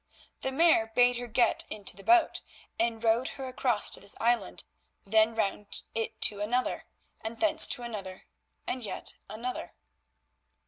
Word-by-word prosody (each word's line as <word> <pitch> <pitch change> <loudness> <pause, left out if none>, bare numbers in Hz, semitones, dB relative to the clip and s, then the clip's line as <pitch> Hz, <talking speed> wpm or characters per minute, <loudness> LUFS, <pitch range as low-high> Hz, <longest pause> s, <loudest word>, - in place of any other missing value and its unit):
The 265 - -2
Mare 275 -6 +4
bade 245 +2 +3
her 245 0 -5
get 235 +2 +2
into 210 -2 -2
the 195 - -11
boat 345 -2 +3 0.4
and 230 0 -1
rowed 230 +3 +2
her 265 -1 -5
across 250 -3 0
to - - +4
this 200 - -6
island, 235 +1 0 0.4
then 220 +2 +3
round 205 -1 -3
it 225 0 -3
to 205 -1 +2
another, 245 +5 -1 0.4
and 225 +1 -6
thence 320 -1 +7
to 245 - -4
another 195 -5 -7 0.4
and 255 - -3
yet 210 - -4 0.2
another. 240 +4 -5
230 Hz, 150 wpm, -29 LUFS, 220-250 Hz, 0.4 s, thence